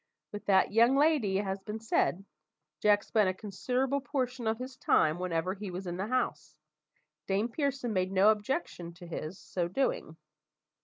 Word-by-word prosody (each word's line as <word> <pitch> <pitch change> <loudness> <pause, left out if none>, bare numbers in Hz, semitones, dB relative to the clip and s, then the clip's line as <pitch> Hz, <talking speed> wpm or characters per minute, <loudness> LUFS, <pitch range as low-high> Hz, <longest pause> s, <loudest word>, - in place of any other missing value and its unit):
With 205 - -7
that 190 -2 +4
young 235 +5 +5
lady, 280 -10 +3
as 205 - -2
has 195 0 -2
been 210 +2 -6
said, 195 -4 0 0.5
Jack 205 +2 +4
spent 210 -4 +2
a 185 - -2
considerable 250 +8 -1
portion 255 -4 -2
of 220 0 +1
his 255 +2 -7
time, 155 -9 +2
whenever 180 0 -1
he 200 0 -6
was 185 +2 -6
in 175 0 -4
the 195 +3 -2
house; 155 - -2 0.7
Dame 200 +4 +1
Pearson 270 -3 -2
made 185 -1 0
no 195 +2 +5
objection 210 - -3
to 175 0 -12
his 170 +1 -6
so 170 +3 -3
doing. 175 - -1
205 Hz, 170 wpm, -30 LUFS, 185-250 Hz, 0.7 s, young